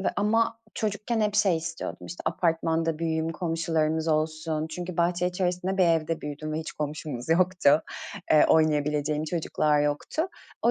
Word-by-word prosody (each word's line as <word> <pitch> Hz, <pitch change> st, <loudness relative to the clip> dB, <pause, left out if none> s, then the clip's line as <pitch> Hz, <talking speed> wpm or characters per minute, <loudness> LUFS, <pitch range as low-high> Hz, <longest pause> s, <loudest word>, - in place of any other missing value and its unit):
ve 190 Hz, -, +1 dB
ama 225 Hz, +2 st, +2 dB, 0.2 s
çocukken 215 Hz, +2 st, -1 dB
hep 210 Hz, -1 st, +1 dB
şey 195 Hz, -5 st, +4 dB
istiyordum. 165 Hz, +1 st, -5 dB
İşte, 175 Hz, -, -7 dB
apartmanda 165 Hz, -1 st, 0 dB
büyüyeyim, 160 Hz, -1 st, -1 dB
komşularımız 160 Hz, -2 st, 0 dB
olsun. 155 Hz, 0 st, 0 dB
Çünkü 175 Hz, +1 st, -5 dB
bahçe 175 Hz, +1 st, +2 dB
içerisinde 180 Hz, +1 st, -1 dB
bir 185 Hz, -, +6 dB
evde 165 Hz, -1 st, +1 dB
büyüdüm 150 Hz, +1 st, -5 dB
ve 155 Hz, -, -1 dB
hiç 160 Hz, 0 st, -5 dB
komşumuz 150 Hz, -4 st, -5 dB
yoktu. 170 Hz, -3 st, +4 dB, 0.5 s
Eee, 155 Hz, -, +6 dB
oynayabileceğim 150 Hz, -1 st, +2 dB
çocuklar 155 Hz, -2 st, +1 dB
yoktu. 145 Hz, -, -1 dB, 0.4 s
O -, -, +4 dB
160 Hz, 145 wpm, -27 LUFS, 155-180 Hz, 0.5 s, bir